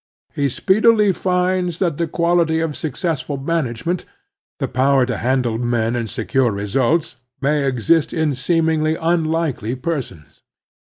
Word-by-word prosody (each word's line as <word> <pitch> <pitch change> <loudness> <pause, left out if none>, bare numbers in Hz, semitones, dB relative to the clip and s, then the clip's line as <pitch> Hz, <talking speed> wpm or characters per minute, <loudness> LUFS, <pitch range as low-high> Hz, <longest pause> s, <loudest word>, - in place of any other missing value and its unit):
He 140 -1 0
speedily 210 - +3
finds 180 -1 0
that 170 -6 0
the 170 - -1
quality 170 -1 +1
of 160 -2 -2
successful 150 -2 -3
man 160 +3 0
agement, 165 +10 -3 0.5
the - - -2
power 135 0 +2
to 125 -3 -3
handle 120 -2 0
men 120 -1 0
and 115 -2 -3
secure 125 +2 0
results, 125 +9 0 0.2
may 145 0 +1
exist 135 +5 +2
in 160 -3 0
seemingly 160 +3 +1
unlikely 160 -7 -1
persons. 125 - -5
150 Hz, 130 wpm, -19 LUFS, 125-170 Hz, 0.5 s, speedily